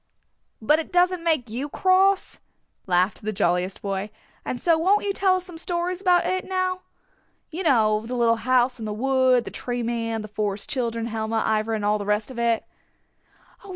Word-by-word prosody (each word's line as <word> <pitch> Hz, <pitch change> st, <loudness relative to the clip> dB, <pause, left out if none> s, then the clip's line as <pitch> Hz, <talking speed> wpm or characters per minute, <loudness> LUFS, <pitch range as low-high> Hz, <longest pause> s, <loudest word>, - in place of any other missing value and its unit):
"But 300 Hz, +8 st, +3 dB
it 325 Hz, -, -6 dB
doesn't 360 Hz, -1 st, +2 dB
make 310 Hz, -7 st, +1 dB
you 250 Hz, +7 st, -4 dB
cross," 380 Hz, +3 st, +2 dB, 0.5 s
laughed 180 Hz, +2 st, +1 dB
the 215 Hz, -, -3 dB
jolliest 180 Hz, +1 st, -1 dB
boy. 195 Hz, +1 st, -3 dB, 0.3 s
"And 245 Hz, -, -4 dB
so 335 Hz, +3 st, +3 dB
won't 380 Hz, +6 st, +2 dB
you 400 Hz, -, 0 dB
tell 380 Hz, -1 st, +2 dB
us 370 Hz, -1 st, -3 dB
some 350 Hz, -3 st, -10 dB
stories 350 Hz, +1 st, -2 dB
about 360 Hz, -2 st, +3 dB
it 370 Hz, 0 st, -1 dB
now. 370 Hz, -1 st, -2 dB, 0.7 s
You 335 Hz, +4 st, -4 dB
know, 220 Hz, -, +3 dB
the 245 Hz, +3 st, -5 dB
little 230 Hz, -1 st, +3 dB
house 250 Hz, +1 st, +1 dB
in 220 Hz, -, -5 dB
the 210 Hz, -, -3 dB
wood, 255 Hz, +1 st, +2 dB
the -, -, -7 dB
Tree 245 Hz, -1 st, -4 dB
Man, 230 Hz, -1 st, -2 dB
the -, -, -7 dB
Forest 210 Hz, +4 st, -3 dB
Children, 230 Hz, -4 st, -2 dB
Helma, 225 Hz, -1 st, -2 dB
Ivra 220 Hz, +1 st, 0 dB
and 210 Hz, -1 st, -3 dB
all 210 Hz, +1 st, +2 dB
the 205 Hz, -, -5 dB
rest 210 Hz, +3 st, 0 dB
of 245 Hz, -, -7 dB
it." 235 Hz, -1 st, +1 dB
240 Hz, 190 wpm, -24 LUFS, 215-345 Hz, 0.7 s, But